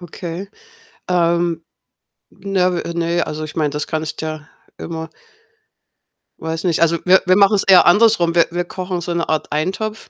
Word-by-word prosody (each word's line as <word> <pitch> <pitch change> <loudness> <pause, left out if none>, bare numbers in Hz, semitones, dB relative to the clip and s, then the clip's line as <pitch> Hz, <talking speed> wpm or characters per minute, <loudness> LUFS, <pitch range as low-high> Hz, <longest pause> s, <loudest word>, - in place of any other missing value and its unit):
Okay. 175 +2 -7 0.6
Ähm, 170 -1 +1 0.7
Ne, 185 -2 -1
w 170 - -5
ne, 170 0 -1
also, 155 0 -5
ich 155 - -7
meine, 150 -2 0
das 150 0 -4
kannst 155 0 -4
ja 155 -1 -5 0.3
immer 160 0 -6 1.3
weiß 160 0 -4
nicht. 170 -2 +1
Also, 170 0 +3
wir 190 +1 +5
wir 185 0 +4
machen's 200 0 +4
eher 185 -2 +6
andersrum. 175 -3 +4
Wir 170 - +4
wir 175 +1 -2
kochen 180 -1 -5
so 175 +1 -3
'ne 170 -1 -2
Art 155 -1 -2
Eintopf, 195 +8 -3
170 Hz, 160 wpm, -18 LUFS, 160-185 Hz, 1.3 s, eher